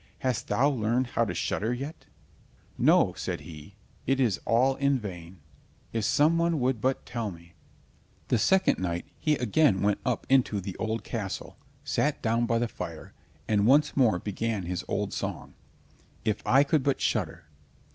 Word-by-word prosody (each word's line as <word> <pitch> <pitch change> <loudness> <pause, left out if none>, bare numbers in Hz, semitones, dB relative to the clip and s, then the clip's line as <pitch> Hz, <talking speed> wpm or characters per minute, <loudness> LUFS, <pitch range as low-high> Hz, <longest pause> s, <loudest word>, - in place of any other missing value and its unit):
Hast 130 -3 -1
thou 120 +7 +3
learned 125 -2 +1
how - - +2
to - - -4
shudder 110 +4 -1
yet?" 135 +6 -6 0.7
"No," - - +4
said - - -4
he, 80 +3 -11 0.3
"it 135 +1 +2
is 115 -8 +2
all 125 +5 +3
in 140 0 +2
vain. 90 -5 -8 0.5
If 115 -2 -1
some 155 +7 +3
one 170 -2 +1
would 125 -3 0
but 130 +2 0
tell 115 -3 -3
me!" 85 -1 -13 0.8
The 120 - +3
second 190 - +3
night 85 -2 -2
he 155 -1 +2
again 125 -4 +2
went 100 0 +2
up 125 -3 -1
into 130 -6 +3
the 95 -1 -6
old 110 0 -2
castle, 100 -5 -5 0.3
sat 145 +1 0
down 115 +1 +1
by 115 - +2
the 120 +1 0
fire, - - -8 0.3
and 105 -1 +2
once 145 +4 +4
more 115 -9 +4
began 105 +2 -3
his 90 0 -3
old - - -2
song: - - -5 0.7
"If 110 -1 0
I 135 +3 +6
could 145 +1 +1
but 140 +1 0
shudder!" - - -1
115 Hz, 165 wpm, -28 LUFS, 100-135 Hz, 0.8 s, I